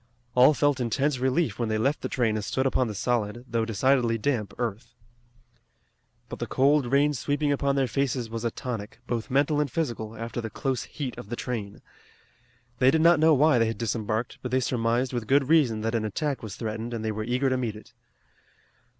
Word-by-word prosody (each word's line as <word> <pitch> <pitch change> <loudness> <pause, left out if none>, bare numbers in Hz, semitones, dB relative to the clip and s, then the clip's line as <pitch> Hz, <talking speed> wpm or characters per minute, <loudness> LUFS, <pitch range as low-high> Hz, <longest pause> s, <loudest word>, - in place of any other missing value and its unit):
All 130 +5 +6
felt 145 +1 +2
intense 130 +3 0
relief 130 +5 0
when 115 -2 -1
they 110 - 0
left 135 +7 0
the - - -3
train 115 -5 +1
and 105 - -2
stood 130 +5 -1
upon 130 -1 +2
the 105 - -5
solid, 120 +2 -1
though 115 -2 0
decidedly 120 +1 +2
damp 115 -3 -1
earth. 120 +1 -4 1.3
But - - -8
the - - -3
cold 140 0 +3
rain 140 +3 +3
sweeping 145 +2 -1
upon 140 -1 +1
their 135 -1 +2
faces 130 -1 -1
was 115 0 -5
a 115 - +1
tonic, 115 -3 -6
both 115 -2 -3
mental 145 +3 +2
and 145 - -1
physical, 115 -8 -3
after 115 +1 -4
the 110 - -5
close 130 +2 -2
heat 135 -4 -5
of 100 - -10
the 120 - -3
train. 110 -5 -5 1.0
They 130 0 +5
did 160 +3 +3
not 170 -1 +6
know 160 0 +5
why 150 -2 +4
they 115 - +3
had 110 - -3
disembarked, 110 0 -2
but 125 - -4
they 130 +2 +2
surmised 120 +1 0
with 120 -3 -3
good 135 0 +3
reason 135 -10 +3
that 115 +1 -1
an 115 -2 0
attack 140 +7 -2
was 110 -3 -7
threatened 115 +1 -4
and 110 -1 -4
they 110 - 0
were 110 0 -3
eager 125 +4 0
to - - +2
meet 115 -4 -2
it. 105 - -14
125 Hz, 210 wpm, -26 LUFS, 115-140 Hz, 1.3 s, All